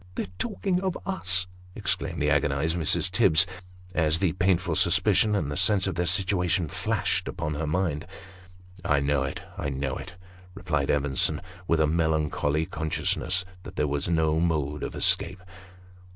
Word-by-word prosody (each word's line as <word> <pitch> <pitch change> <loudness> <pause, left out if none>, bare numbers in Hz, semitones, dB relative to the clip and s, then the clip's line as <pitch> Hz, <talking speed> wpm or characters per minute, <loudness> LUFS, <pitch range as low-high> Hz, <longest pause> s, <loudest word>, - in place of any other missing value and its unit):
" 90 - -23
They're - - -2
talking 195 -4 -1
of 190 -2 -2
us! 95 - -2 0.2
" 90 0 -23
exclaimed - - -2
the - - +2
agonised 75 +4 +1
Mrs. 80 -4 +2
Tibbs, 80 +4 +5 0.5
as 80 -3 +2
the 95 -1 +1
painful 90 -2 +1
suspicion, 105 +6 +4
and 75 -7 -1
a - - -4
sense 100 +1 +3
of 95 - -1
their 85 +1 -1
situation, 90 -1 +1
flashed - - -1
upon 75 - -3
her 75 +1 -3
mind. 80 -2 -1 0.4
" 90 0 -23
I 75 -1 +2
know 70 0 +1
it 70 0 -4 0.2
I 75 - -2
know 65 -1 -3
it," 95 -2 -9 0.4
replied 75 -7 -1
Evenson, 70 -2 +2 0.3
with 85 - +2
a 80 - +4
melancholy 80 -1 0
con 80 0 -4
sciousness 90 +3 -1 0.2
that - - -11
there 75 - 0
was 70 +3 -2
no 80 -1 +2
mode 75 -3 -1
of - - -5
escape. 95 -1 +2
80 Hz, 170 wpm, -26 LUFS, 75-90 Hz, 0.5 s, Tibbs